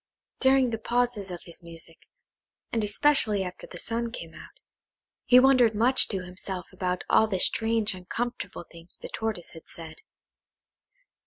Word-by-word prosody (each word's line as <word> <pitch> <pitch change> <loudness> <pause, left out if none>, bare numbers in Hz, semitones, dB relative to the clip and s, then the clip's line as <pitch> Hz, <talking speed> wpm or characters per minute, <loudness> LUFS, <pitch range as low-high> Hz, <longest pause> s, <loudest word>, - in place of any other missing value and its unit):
During 265 -2 +4
the 225 - -3
pauses 235 -4 0
of 175 -1 -7
his 170 - -13
music, 165 -1 -10 0.7
and 225 -2 0
especially 210 -2 +2
after 180 -1 -8
the 175 - -9
sun 230 +5 -2
came 165 -8 -8
out, - - -14 0.7
he 250 - +7
wondered 255 -4 +5
much 245 +5 +4
to 190 -3 -3
himself 185 0 -6
about 180 -1 -2
all 220 - +4
the 190 -4 -2
strange 225 +1 +1
uncomfortable 190 0 -5
things 170 0 -14
the - - -9
Tortoise 220 -6 -4
had 165 - -13
said. 165 -1 -9
210 Hz, 150 wpm, -27 LUFS, 180-235 Hz, 0.7 s, he